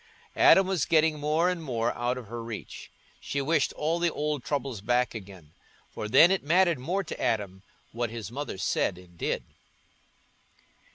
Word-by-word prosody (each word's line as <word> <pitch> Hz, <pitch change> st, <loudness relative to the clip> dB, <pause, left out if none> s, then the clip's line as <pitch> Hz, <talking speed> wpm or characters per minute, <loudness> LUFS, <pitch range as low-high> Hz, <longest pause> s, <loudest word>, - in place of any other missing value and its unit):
Adam 190 Hz, -, +6 dB
was 190 Hz, -2 st, 0 dB
getting 155 Hz, -1 st, +3 dB
more 155 Hz, +4 st, +1 dB
and 180 Hz, -2 st, -1 dB
more 115 Hz, -5 st, -1 dB
out 120 Hz, +1 st, -2 dB
of 125 Hz, -, -7 dB
her 115 Hz, +2 st, -7 dB
reach; 115 Hz, -2 st, -8 dB, 0.3 s
she 140 Hz, -, -3 dB
wished 150 Hz, +1 st, +1 dB
all 160 Hz, +3 st, -1 dB
the 170 Hz, 0 st, +2 dB
old 150 Hz, -3 st, -2 dB
troubles 135 Hz, -6 st, -3 dB
back 120 Hz, +3 st, +1 dB
again, 95 Hz, -8 st, -11 dB, 0.4 s
for 105 Hz, -, -5 dB
then 140 Hz, -, +7 dB
it 195 Hz, -, +1 dB
mattered 170 Hz, 0 st, +3 dB
more 180 Hz, +10 st, -1 dB
to 165 Hz, -, -7 dB
Adam 105 Hz, -6 st, -1 dB, 0.3 s
what 120 Hz, 0 st, -2 dB
his 115 Hz, -1 st, -7 dB
mother 140 Hz, -5 st, -5 dB
said 90 Hz, -, 0 dB
and 90 Hz, -1 st, -16 dB
did. -, -, -2 dB
130 Hz, 170 wpm, -27 LUFS, 115-160 Hz, 0.4 s, then